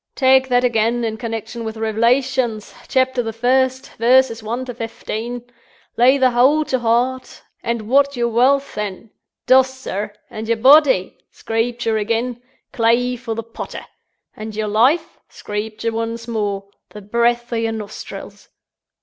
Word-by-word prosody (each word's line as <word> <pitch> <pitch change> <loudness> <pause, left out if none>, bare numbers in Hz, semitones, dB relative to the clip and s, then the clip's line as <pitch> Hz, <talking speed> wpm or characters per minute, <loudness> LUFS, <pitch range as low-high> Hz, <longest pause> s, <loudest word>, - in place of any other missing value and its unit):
Tak' 265 -1 +4
that 245 -1 +2
again, 235 0 +1
in 220 -1 -2
connection 230 0 -5
with 220 0 -5
Rev'lations, 235 +1 0
Chapter 260 -1 +1
the 225 -1 -4
First, 260 +3 0
verses 240 0 +3
One 235 +4 -4
to 250 - -6
Fefteen. 230 +1 -5 0.5
Lay 255 +3 +5
the 260 -2 +3
whole 275 +6 +3
to 260 - -1
heart; 245 +2 -1 0.2
and 235 -1 -2
what's 280 +2 +3
your 235 0 +1
Walth, 270 +4 +2
then? 210 +1 -5 0.3
Dross, 260 0 +5
sirs! 210 -6 -5 0.2
And 220 0 -7
your 230 0 +1
body? 260 -5 +5 0.2
(Screepture 225 -1 -1
again.) 230 +3 -2 0.3
Clay 240 +2 +2
for 230 -2 -5
the 230 - -4
potter! 230 +1 -8 0.5
And 215 0 -7
your 215 0 -2
life? 250 +11 +2
(Screepture 215 +2 -4
once 230 +1 -4
more.) 205 -3 -2 0.2
The 210 - -10
Breeth 235 +3 0
o' - - 0
your 225 0 -1
Nostrils!" 215 -2 -9
235 Hz, 145 wpm, -19 LUFS, 225-255 Hz, 0.5 s, Lay